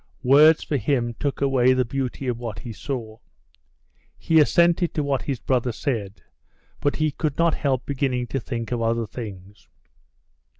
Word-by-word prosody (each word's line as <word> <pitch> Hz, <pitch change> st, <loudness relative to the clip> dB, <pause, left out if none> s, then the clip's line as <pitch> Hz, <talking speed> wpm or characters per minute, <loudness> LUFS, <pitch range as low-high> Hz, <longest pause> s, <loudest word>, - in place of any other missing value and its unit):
Words 150 Hz, +5 st, +6 dB
for 145 Hz, -, -1 dB
him 120 Hz, 0 st, 0 dB
took 140 Hz, -1 st, -2 dB
away 130 Hz, -2 st, +3 dB
the 130 Hz, -1 st, +1 dB
beauty 135 Hz, +1 st, -4 dB
of 120 Hz, -2 st, -2 dB
what 115 Hz, -3 st, -5 dB
he 120 Hz, -4 st, -7 dB
saw. 115 Hz, -3 st, -6 dB, 1.0 s
He 160 Hz, -1 st, +3 dB
assented 170 Hz, +3 st, +3 dB
to 150 Hz, -, 0 dB
what 140 Hz, -2 st, 0 dB
his 135 Hz, -4 st, -3 dB
brother 125 Hz, -2 st, 0 dB
said, 110 Hz, -6 st, -4 dB, 0.6 s
but 145 Hz, -, 0 dB
he 155 Hz, -1 st, 0 dB
could 150 Hz, 0 st, -3 dB
not 170 Hz, -1 st, +3 dB
help 130 Hz, -3 st, -1 dB
beginning 130 Hz, -3 st, -1 dB
to 135 Hz, -, -1 dB
think 115 Hz, -1 st, -5 dB
of 120 Hz, -1 st, -1 dB
other 115 Hz, 0 st, 0 dB
things. 105 Hz, -3 st, -9 dB
130 Hz, 165 wpm, -23 LUFS, 115-145 Hz, 1.0 s, Words